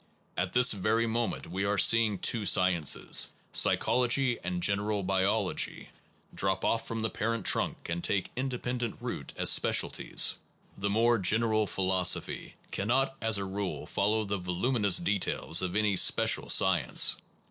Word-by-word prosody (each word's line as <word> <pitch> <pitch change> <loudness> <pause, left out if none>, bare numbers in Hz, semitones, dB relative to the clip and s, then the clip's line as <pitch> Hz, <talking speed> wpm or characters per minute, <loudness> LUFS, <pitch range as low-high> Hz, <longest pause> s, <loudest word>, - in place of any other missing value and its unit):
At 90 +1 -3
this 125 +1 +5
very 110 +3 0
moment 115 0 -3
we 95 +3 -4
are 100 +1 -1
see 115 +3 +5
ing 105 -2 -4
two 110 +3 0
sciences, 90 -6 +2 0.3
psychology 125 0 +2
and 90 0 -4
general 100 0 0
biol 95 +2 0
ogy, - - -3 0.4
drop 95 -1 -1
off 115 0 -1
from 115 -1 -5
the 110 - 0
parent 115 +1 -3
trunk - - -1
and 85 0 -4
take 100 -2 -2
independent 125 -3 -4
root - - -6
as - - +3
specialties. - - +1 0.4
The 100 +1 -3
more 115 +2 +2
general 110 +2 +1
philosophy 95 -2 -1 0.2
cannot 135 +7 -1
as 115 -2 +1
a 100 - -4
rule 95 0 -5
follow 110 +2 -1
the 100 -1 -4
voluminous 100 +3 0
details 90 -2 -1
of 90 0 -4
any 105 -2 +1
special - - +3
science. - - +3
105 Hz, 145 wpm, -28 LUFS, 95-115 Hz, 0.4 s, this